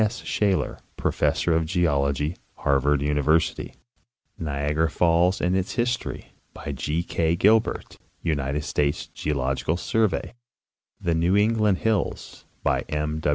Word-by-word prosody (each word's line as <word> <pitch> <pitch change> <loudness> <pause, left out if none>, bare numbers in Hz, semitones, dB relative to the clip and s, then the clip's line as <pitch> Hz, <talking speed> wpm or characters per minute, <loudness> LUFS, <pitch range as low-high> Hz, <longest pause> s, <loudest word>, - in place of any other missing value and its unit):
S. 110 +2 -1
Shaler, 100 -3 0 0.2
professor 85 - +1
of 80 - +3
geol 80 -5 +1
ogy, 75 +4 -2 0.2
Harvard 70 +1 +1
University; 75 +2 +1 0.6
Niagara 75 +1 0
falls 85 +3 +2
and 90 +1 +1
its 95 -1 -1
history, 120 0 -2 0.2
by - - -5
G. 75 +5 -2
K, 85 -1 0
Gilbert, 110 +5 +2 0.2
United 75 -2 -1
States 75 -1 0
Geological 70 +2 -2
Survey; 110 -2 0 0.7
The 85 - 0
New 85 +4 +2
England 105 -2 +3
hills, 110 -2 -2 0.2
by - - +2
W. 75 0 -2
80 Hz, 120 wpm, -25 LUFS, 75-95 Hz, 0.7 s, of